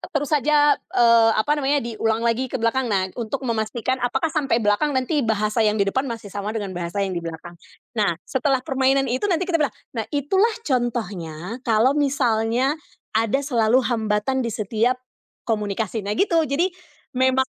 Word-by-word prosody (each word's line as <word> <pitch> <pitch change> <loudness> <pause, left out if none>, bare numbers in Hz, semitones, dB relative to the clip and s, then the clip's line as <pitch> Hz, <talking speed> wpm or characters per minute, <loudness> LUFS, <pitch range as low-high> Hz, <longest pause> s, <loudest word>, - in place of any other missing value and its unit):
terus 290 +1 -1
saja, 295 +1 +4
eee, 230 -1 +4
apa 220 +7 +1
namanya, 290 0 +1
diulang 225 0 -1
lagi 240 +3 +1
ke - - -5
belakang. 240 +3 0
Nah, 190 -2 +1
untuk 255 +4 -3
memastikan 230 +3 -1
apakah 265 +5 0
sampai 275 -6 +1
belakang 260 +8 +1
nanti 285 +4 0
bahasa 215 0 0
yang 210 -1 +3
di 200 - +2
depan 265 +7 -1
masih 220 -4 -7
sama 205 +1 -3
dengan 200 -3 -4
bahasa 175 +3 -2
yang 190 - -3
di 170 - -3
belakang. 165 +1 -7 0.4
Nah, 205 -7 +1
setelah 265 -1 0
permainan 270 0 +2
itu 255 - -1
nanti 355 0 +1
kita 335 -3 0
bilang, 260 -8 0 0.2
"Nah, 225 -2 -3
itulah 380 - +2
contohnya 215 - -2
kalau 230 +2 +3
misalnya 260 -2 +1 0.4
ada 225 +4 +2
selalu 240 -1 +3
hambatan 220 +2 0
di 235 - -2
setiap 220 +4 0 0.5
komunikasi." 215 0 -2
Nah 205 +2 -3
gitu 335 -5 +3
jadi 310 +6 +2 0.5
memang, 260 +1 +3
235 Hz, 165 wpm, -22 LUFS, 215-270 Hz, 0.5 s, saja